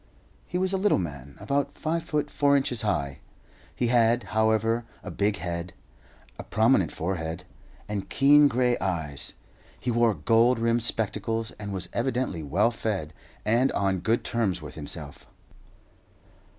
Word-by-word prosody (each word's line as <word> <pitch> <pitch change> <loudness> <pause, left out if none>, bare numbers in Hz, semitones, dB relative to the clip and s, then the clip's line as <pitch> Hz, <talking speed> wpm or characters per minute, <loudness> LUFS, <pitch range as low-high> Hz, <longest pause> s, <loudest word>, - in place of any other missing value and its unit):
He 180 - -2
was 185 +1 0
a 190 - +1
little 205 +2 +3
man, 70 -6 -6
about 140 +8 -1
five 165 +2 -1
feet 150 -2 -2
four 140 -1 +3
inches 125 -4 -1
high. 70 -11 -1 0.6
He 125 - 0
had, 120 0 +3
however, 110 +1 +2 0.2
a - - -6
big 100 0 +1
head, 85 0 -4 0.7
a - - -5
prominent 110 - +2
forehead, 85 -1 -3 0.4
and 105 -2 -4
keen 145 +1 +6
grey 125 -2 +1
eyes. 80 -7 -3 0.5
He 125 - -1
wore 115 -2 +3
gold 115 +1 +3
rimmed 115 +1 +1
spectacles, 110 0 0
and 100 -1 -5
was 95 -2 -3
evidently 120 -8 -1
well 95 +11 +2
fed 100 -9 -3 0.3
and 120 +5 +3
on 95 -2 +1
good 115 +6 0
terms 110 -7 -1
with 75 -3 -9
himself. 75 -1 -7
110 Hz, 145 wpm, -26 LUFS, 90-125 Hz, 0.7 s, keen